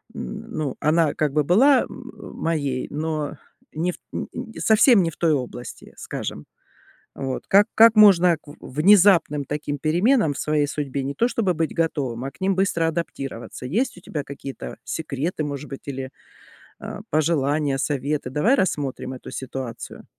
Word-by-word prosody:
н 60 - -7
ну, 145 -4 -3
она 155 -1 +2
как 150 -2 0
бы 150 -1 +2
была 255 - +5
м - - -10 0.2
моей, 140 -6 -1
но 155 0 -3 0.4
не 170 +4 -1
в - - -12
т - - -40 0.2
н - - -4
н 245 -2 -7
совсем 220 -1 +5
не 165 - 0
в - - -17
той 165 -2 +2
области, 125 -3 -6
скажем. - - -6 0.7
Вот, 135 -1 -4
как 200 +2 +5
как 225 0 +7
можно 180 -5 +7
к - - -33
в 145 - -11 0.2
внезапным 175 -6 +5
таким 145 0 -4
переменам 170 - +2
в - - -7
своей 150 -1 +1
судьбе 140 -3 -3
не 140 +1 -3
то 235 - +2
чтобы 195 -8 0
быть 160 0 -2
готовым, 135 -7 -1
а 135 - -4
к - - -25
ним 190 0 +1
быстро 170 -4 +1
адаптироваться? 135 -7 -5
Есть 215 - -1
у - - -13
тебя 150 -4 -5
какие-то 140 -1 -8
секреты, 155 +1 -3
может 145 0 -5
быть, 135 - -7
или, 135 -1 -5 0.7
э, - - -6
пожелания, 145 -2 +1
советы? 140 -1 -1
Давай 215 - +3
рассмотрим 140 - -2
эту 130 - -9
ситуацию. 130 -3 -7
155 Hz, 170 wpm, -23 LUFS, 140-180 Hz, 0.7 s, как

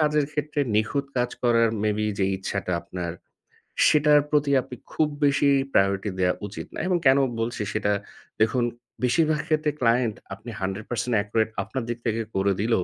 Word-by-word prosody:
কাজের 150 -1 +2
ক্ষেত্রে 150 0 -2 0.2
নিখুঁত 125 +6 0
কাজ 125 0 +1
করার 115 -1 +4
মেবি 105 0 0
যেই 95 -1 +2
ইচ্ছাটা 95 -1 -3
আপনার 85 -1 -5 0.8
সেটার 150 -1 +5
প্রতি 145 -1 +2
আপনি 125 - -9 0.2
খুব 155 - +2 0.2
বেশি 140 0 +3 0.2
প্রায়োরিটি 100 +1 +2
দেওয়া 90 -1 +3
উচিত 105 - -8
না - - -5
এবং 180 - +2
কেনো 135 +1 +6 0.2
বলছি 115 -1 -2
সেটা 105 -1 0 0.5
দেখুন, 120 +3 +3 0.4
বেশিরভাগ 155 +4 +2
ক্ষেত্রে 155 -1 +1
ক্লায়েন্ট 115 -2 +2 0.2
আপনি 105 +5 -10
100% 110 +5 -2
একুরেট 110 +1 0
আপনার 110 +6 -4
দিক 120 - -2
থেকে 115 -1 0
করে 95 +1 +2
দিলেও 110 -3 +1
115 Hz, 160 wpm, -25 LUFS, 105-140 Hz, 0.8 s, কেনো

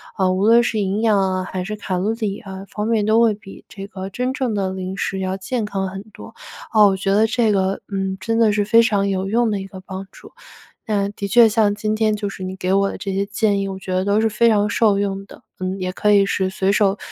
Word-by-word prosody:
啊， 190 -2 +1
无 185 +2 0
论 230 +2 +6
是 220 -2 -1
营 200 +1 -1
养 215 -3 +3
啊 185 -1 0
还 185 0 -4
是 215 +3 -4
卡 195 -3 -3
路 195 +4 0
里 215 -3 -3
啊 195 0 -9
方 210 0 -3
面 225 -2 +1
都 220 +2 +3
会 230 -2 +4
比 205 -1 -13
这 195 -1 -9
个 190 -2 -7
真 250 +6 -2
正 260 -5 -2
的 195 -2 -1
零 190 0 -5
食 195 0 -3
要 190 0 -2
健 220 +4 -3
康 195 -2 -3
很 195 +1 -7
多。 - - -12 0.4
啊， 215 -2 +6
我 195 - +2
觉 195 +1 -1
得 215 +2 +4
这 235 -2 +1
个 195 -1 0
嗯 195 -1 -2
真 225 +4 -1
的 225 -2 +4
是 205 0 +1
非 230 +3 +5
常 200 -4 +1
有 190 0 -1
用 230 +3 +1
的 205 - -1
一 195 - -7
个 190 -1 -11
帮 190 0 -8
助， - - -15 0.5
嗯， 200 -2 0
的 200 - -4
确 235 +3 +6
像 215 -2 +2
今 215 +1 -1
天 215 -1 +1
就 205 -1 -3
是 190 - -8
你 185 0 -5
给 185 0 -2
我 195 0 +2
的 - - -7
这 195 -2 -4
些 195 +1 0
建 200 0 0
议 195 - -2
我 190 -1 -6
觉 190 - -7
得 185 +1 0
都 205 +1 +2
是 225 - +2
非 225 +2 +3
常 210 -1 +2
受 205 -2 +2
用 195 -1 -2
的， - - -15 0.2
嗯， 185 +1 -3
也 185 0 -2
可 210 +3 +1
以 200 -1 +5
是 190 -1 0
随 190 +1 0
手 200 -1 +2
200 Hz, 290 characters per minute, -20 LUFS, 190-215 Hz, 0.5 s, 论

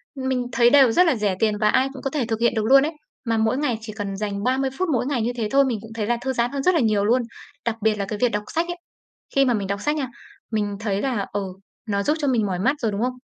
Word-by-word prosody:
mình 260 -2 -1
thấy 240 -1 +4
đều 270 -2 +6
rất 360 +10 +5
là 320 -6 +3
rẻ 210 -4 0
tiền 215 -2 +1
và 210 0 +2
ai 260 +5 +3
cũng 265 - -9
có 270 - -2
thể 270 -3 -1
thực 225 -1 -2
hiện 235 +1 +2
được 220 -1 0
luôn 270 +3 +6
ấy, 310 - -2 0.3
mà 230 -1 +1
mỗi 220 +3 +1
ngày 275 -6 0
chỉ 220 -1 -8
cần 205 -2 -4
dành 200 -1 -3
30 265 +2 +1
phút 370 - 0
mỗi 245 - 0
ngày 270 -3 -1
như 230 +2 0
thế 225 -2 -1
thôi, 275 0 +5
mình 240 -5 -1
cũng 225 0 -12
thấy 215 -2 -3
là 240 +1 +1
thư 265 0 -2
giãn 240 0 0
hơn 280 -1 -3
rất 365 - +4
là 335 - +3
nhiều 215 -5 +2
luôn. 245 +4 +3 0.4
Đặc 235 -2 0
biệt 220 0 +2
là 200 -1 -3
cái 205 +1 -5
việc 245 - +3
đọc 210 0 -2
sách 330 +2 +1
ấy, 350 0 -4 0.6
khi 275 0 +5
mà 250 - +2
mình 205 -3 -2
đọc 200 +1 -3
sách 295 +7 0
nha, 285 -4 -2 0.4
mình 205 -2 -1
thấy 205 -2 -1
là, 245 -7 -1
ừ, 205 - -1 0.5
nó 200 -1 0
giúp 300 +8 +1
cho 290 - -1
mình 240 -5 +2
mỏi 185 -3 -2
mắt 265 +9 +2
rồi, 225 -4 0
đúng 200 +1 -3
không? 250 +1 0
235 Hz, 305 wpm, -23 LUFS, 210-265 Hz, 0.6 s, đều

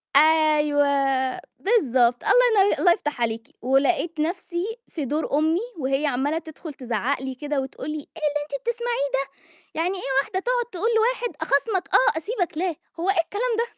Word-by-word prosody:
أيوه، 300 -1 +4 0.7
بالضبط، 255 - +2
الله 480 -5 +5
يني 410 - +1
الله 355 - +5
يفتح 295 -6 -2
عليكِ، 225 -1 -1
ولقيت 295 +6 +1
نَفْسي 350 +6 -2
في 305 -4 -5
دور 295 +4 -2
أمي 320 +3 +2 0.2
وهي 270 +2 0
عَمّالة 280 +4 0
تدخُل 320 -1 -8
تزعق 250 0 -2
لي 265 -1 -5
كده 290 +1 -2
وتقول 265 +1 -7
لي: 305 - -3
"إيه 295 - -9 0.2
اللي 295 0 -2
أنتِ 280 -2 -6
بتسمعيه 475 -9 -1 0.5
ده؟ 315 - -8
يعني 365 +3 -1
إيه 275 - -5
واحدة 375 +6 -3
تقعُد - - 0
تقول 380 +5 -1
لواحد 480 +2 +1
أخاصمك 390 -5 0
آه، 320 -11 +4
أسيبك 360 -2 -3
لا، 350 -2 -1 0.2
هو 365 +3 +1
إيه 390 - +3
الكلام 455 +6 -1
ده؟" 465 - +2
315 Hz, 170 wpm, -24 LUFS, 280-390 Hz, 0.7 s, الله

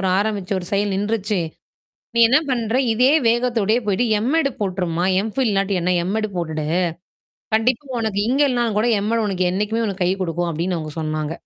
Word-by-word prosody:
ஒரு 190 - 0
ஆரம்பிச்சு 205 -2 -2
ஒரு 175 - -7
செயல் 200 0 +1
நின்றுச்சு. 205 0 -1 0.8
நீ - - +2
என்ன 255 +4 +5
பண்ற? 235 -2 -1 0.2
இதே 250 +5 +4 0.2
வேகத்தோடயே 235 -2 +1
போயிட்டு 205 +4 +1 0.2
M.Ed. 290 +1 +2
போட்டுருமா? 180 -4 -1 0.2
M.Phil 250 +4 -1
இல்லாட்டி 195 0 0
என்ன 180 - 0 0.2
M.Ed. 215 +2 -1
போட்டு. 160 -3 -3 0.9
கண்டிப்பா 240 +5 +1
உனக்கு 220 -3 -1
இங்க 270 +3 +1
இல்லனாலும் 240 -4 0
கூட 220 - +2 0.2
M.Ed. 230 +2 +1
உனக்கு 185 -2 -1
என்னைக்குமே 210 +5 -1
உனக்கு 195 -2 -3
கை 180 - +2
கொடுக்கும்." 175 0 -2
அப்பிடின்னு 170 +2 -2
அவுங்க 155 -1 -6
சொன்னாங்க. 155 0 -2
205 Hz, 170 wpm, -21 LUFS, 180-230 Hz, 0.9 s, என்ன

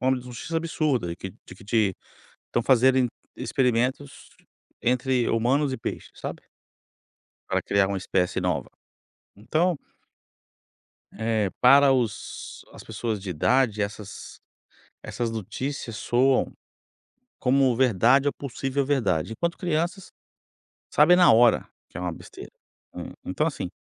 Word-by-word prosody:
uma 130 +1 +2
notícia 125 +6 -4
absurda 150 - -1
e - - -8
que 95 +1 -7
de 90 - -15
que 100 +2 -16
te 105 -3 +1 0.5
estão 120 - -1
fazerem 130 0 +4 0.3
experimentos 125 - -1 0.5
entre 125 0 +1
humanos 130 +5 +1
e - - -3
peixes, - - -6
sabe. - - -6 1.1
Para - - 0
criar 100 -1 +2
uma 100 - -2
espécie 90 -1 0
nova, - - -1 0.7
então 155 - 0 1.3
É, 110 -2 -1
para 140 +2 +7
os 120 -6 -3
as - - -12
pessoas 110 -1 -3
de 95 - -6
idade 110 - +2
essas 105 0 -6 0.6
essas 115 -2 -3
notícias 115 +3 -5
soam 130 +4 +2 0.9
como 130 -1 +3
verdade 130 +3 +4
ou - - +1
possível 135 0 -3
verdade, 110 - 0
enquanto 170 +6 -2
crianças 175 +2 -2 0.8
sabem 165 +4 +6
na 180 -7 +7
hora 115 +1 +5 0.2
que - - -12
é - - -4
uma 90 -2 -2
besteira, - - -11 0.4
hã, - - -7
então, 150 - -1
assim, 140 - -3
125 Hz, 125 wpm, -25 LUFS, 105-135 Hz, 1.3 s, para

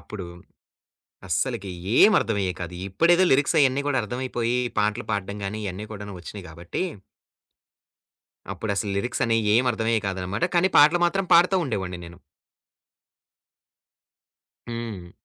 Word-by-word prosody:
అప్పుడు. 100 -2 -8 1.0
అస్సలకి 100 - -1 0.2
ఏం 215 - +7
అర్థమయ్యేయి 100 -5 -1
కాదు 90 0 -6
ఇప్పుడేదో 170 - +4
లిరిక్స్ 145 +5 +3
అవన్నీ 140 -1 +3
కూడా 145 -2 +1
అర్థమైపోయి 120 +1 -2 0.2
పాటలు 105 0 0
పాడ్డం 100 -1 -3
గాని 100 +2 -4
ఇయన్నీ 100 +2 -5
కూడాను 105 -1 -7
ఒచ్చినాయి 95 +3 -9
కాబట్టి 85 - -5 1.7
అప్పుడసలు 100 -1 -3
లిరిక్సనేయి 115 +1 0
ఏం 125 - +3
అర్ధమయ్యేవి 110 -2 -1
కాదనమాట. 95 - -2
కానీ 185 +2 +3
పాటలు 155 +4 +6
మాత్రం 195 +2 -1
పాడుతా 180 +3 +5
ఉండేవాడిని 95 - -4
నేను. 85 +2 -14 2.5
హ్మ్. 115 -7 -6
110 Hz, 115 wpm, -24 LUFS, 95-130 Hz, 2.5 s, ఏం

